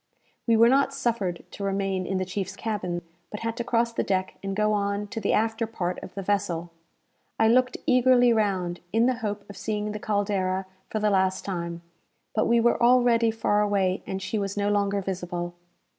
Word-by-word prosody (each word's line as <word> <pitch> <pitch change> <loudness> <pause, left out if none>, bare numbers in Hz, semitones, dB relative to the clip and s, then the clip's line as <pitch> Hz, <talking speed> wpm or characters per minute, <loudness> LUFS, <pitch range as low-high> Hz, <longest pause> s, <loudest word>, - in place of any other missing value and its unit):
We 230 -1 +4
were 230 +1 +7
not 275 +2 +3
suffered 210 -9 -1
to 200 - -7
remain 195 -1 -1
in 190 - -1
the 185 - -1
chief's 190 +1 -4
cabin, 185 -6 -3 0.3
but 210 - -7
had 230 0 -2
to 235 - -1
cross 235 0 +1
the - - 0
deck 190 -1 -1
and 195 0 -3
go 215 +1 +2
on 200 0 -1
to 225 - -5
the 200 - +1
after 225 +1 +1
part 180 -5 -3
of 180 - -10
the 195 - -4
vessel. 180 -4 -1 0.7
I 220 - +4
looked 255 +2 +3
eagerly 250 -1 +5
round, 190 -5 0
in 225 +1 +3
the 255 -1 +2
hope 205 -1 -4
of 200 - -11
seeing 210 -1 -2
the 210 - -5
"Caldera" 195 -3 0 0.2
for - - -2
the 210 0 +2
last 190 -1 +1
time; 170 -3 -4 0.5
but 220 - +1
we 235 0 +4
were 235 +1 +2
already 240 -1 +5
far 220 -2 +1
away, 195 -3 +1
and 190 0 -4
she 215 - -2
was 200 0 -3
no 205 0 +1
longer 200 -1 +1
visible. 175 -2 -4
205 Hz, 200 wpm, -26 LUFS, 190-225 Hz, 0.7 s, were